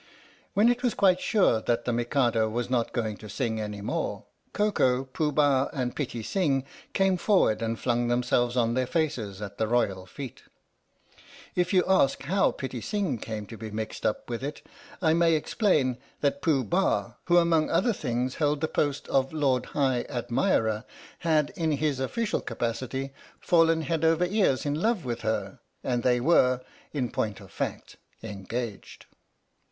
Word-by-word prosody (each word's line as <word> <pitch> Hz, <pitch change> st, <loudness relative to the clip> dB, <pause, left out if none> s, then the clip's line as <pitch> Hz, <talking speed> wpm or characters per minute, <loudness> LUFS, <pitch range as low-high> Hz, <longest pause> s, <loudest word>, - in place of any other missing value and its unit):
When 210 Hz, +3 st, +5 dB
it 245 Hz, 0 st, +2 dB
was 245 Hz, -2 st, 0 dB
quite 185 Hz, -2 st, +4 dB
sure 185 Hz, -, +2 dB
that 120 Hz, +1 st, 0 dB
the 120 Hz, -, 0 dB
Mikado 120 Hz, -2 st, +1 dB
was 120 Hz, +2 st, -3 dB
not 120 Hz, -2 st, +1 dB
going 110 Hz, -3 st, -2 dB
to 110 Hz, -, -11 dB
sing 110 Hz, +1 st, -2 dB
any 105 Hz, -1 st, -5 dB
more, 100 Hz, -, -3 dB, 0.3 s
Koko, 135 Hz, -12 st, +2 dB
Pooh 150 Hz, +3 st, -1 dB
Bah 140 Hz, -2 st, +3 dB
and 125 Hz, -4 st, -2 dB
Pitti 120 Hz, -6 st, -3 dB
Sing 140 Hz, -, +1 dB, 0.3 s
came 195 Hz, -1 st, +2 dB
forward 180 Hz, -, +3 dB
and 115 Hz, 0 st, -1 dB
flung 120 Hz, -1 st, +1 dB
themselves 120 Hz, 0 st, +1 dB
on 115 Hz, -1 st, +2 dB
their 130 Hz, 0 st, 0 dB
faces 120 Hz, -, -2 dB
at 100 Hz, 0 st, -8 dB
the 110 Hz, -, +1 dB
royal 100 Hz, -6 st, 0 dB
feet. 130 Hz, +5 st, -8 dB, 1.1 s
If 180 Hz, 0 st, 0 dB
you 185 Hz, -2 st, +4 dB
ask 165 Hz, -10 st, +3 dB
how 195 Hz, +7 st, +2 dB
Pitti 130 Hz, -3 st, -5 dB
Sing 195 Hz, -, -1 dB
came 110 Hz, -1 st, -5 dB
to 115 Hz, -, -9 dB
be 110 Hz, 0 st, -6 dB
mixed 110 Hz, +1 st, -5 dB
up 105 Hz, -, -1 dB
with 120 Hz, +1 st, -4 dB
it, 145 Hz, +2 st, -5 dB, 0.4 s
I 160 Hz, -1 st, +4 dB
may 165 Hz, -1 st, +4 dB
explain 150 Hz, -, +1 dB, 0.2 s
that 140 Hz, -1 st, 0 dB
Pooh 140 Hz, -5 st, +2 dB
Bah, 190 Hz, +6 st, +1 dB
who 175 Hz, -1 st, +4 dB
among 165 Hz, -2 st, +3 dB
other 190 Hz, +8 st, +2 dB
things 125 Hz, -, -2 dB
held 150 Hz, -1 st, +2 dB
the 160 Hz, -, +1 dB
post 145 Hz, -2 st, -1 dB
of 135 Hz, 0 st, +1 dB
Lord 140 Hz, -5 st, +1 dB
High 130 Hz, -4 st, 0 dB
Admirer, 120 Hz, -, 0 dB, 0.4 s
had, 155 Hz, -3 st, +2 dB
in 160 Hz, -2 st, 0 dB
his 145 Hz, -2 st, 0 dB
official 220 Hz, -, -1 dB
capacity, 130 Hz, +3 st, -3 dB, 0.3 s
fallen 165 Hz, -1 st, +3 dB
head 165 Hz, 0 st, -1 dB
over 165 Hz, +2 st, +3 dB
ears 185 Hz, -9 st, +1 dB
in 145 Hz, -, 0 dB
love 220 Hz, -, +1 dB
with 120 Hz, -1 st, -3 dB
her, 110 Hz, -3 st, -2 dB, 0.2 s
and 120 Hz, -1 st, 0 dB
they 125 Hz, 0 st, +3 dB
were, 130 Hz, -3 st, +4 dB, 0.3 s
in 125 Hz, -6 st, -2 dB
point 105 Hz, -2 st, -2 dB
of -, -, -14 dB
fact, -, -, -5 dB, 0.3 s
engaged. 110 Hz, +1 st, -6 dB
130 Hz, 170 wpm, -27 LUFS, 120-165 Hz, 1.1 s, When